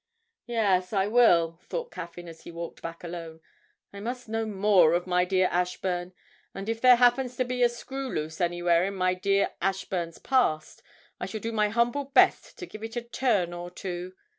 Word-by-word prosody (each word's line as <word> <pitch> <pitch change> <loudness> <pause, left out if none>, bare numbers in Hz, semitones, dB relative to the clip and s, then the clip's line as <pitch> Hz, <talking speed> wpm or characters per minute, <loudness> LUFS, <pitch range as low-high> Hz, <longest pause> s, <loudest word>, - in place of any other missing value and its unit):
'Yes, 200 -5 +1
I 195 -1 +2
will,' 175 -8 +4
thought 485 -1 -4
Caffyn 175 +1 -8
as 165 -1 -11
he - - -10
walked 170 0 -7
back 165 +1 -7
alone. 165 -2 -7 0.5
'I 200 - -8
must 245 +4 -5
know 225 0 -2
more 195 -5 +4
of 175 - -1
my 180 0 +2
dear 185 0 +2
Ashburn; 180 0 -2 0.4
and 195 +1 -6
if 225 0 -2
there 255 -1 +8
happens 245 +1 +2
to 255 - +1
be 250 0 -3
a 240 - +5
screw 265 +3 -6
loose 155 +2 -4
anywhere 175 0 +2
in 200 0 -3
my 185 -1 +1
dear 195 +2 +1
Ashburn's 180 -3 -2
past, 200 -13 0 0.4
I 180 - -4
shall 215 +3 -5
do 225 +2 -4
my 210 -2 +1
humble 235 +5 +1
best 275 - +3
to 360 - -6
give 215 -10 -11
it 225 +1 -6
a 240 - -2
turn 235 -7 0
or 175 0 -6
two. 180 0 -6
195 Hz, 190 wpm, -27 LUFS, 175-235 Hz, 0.5 s, there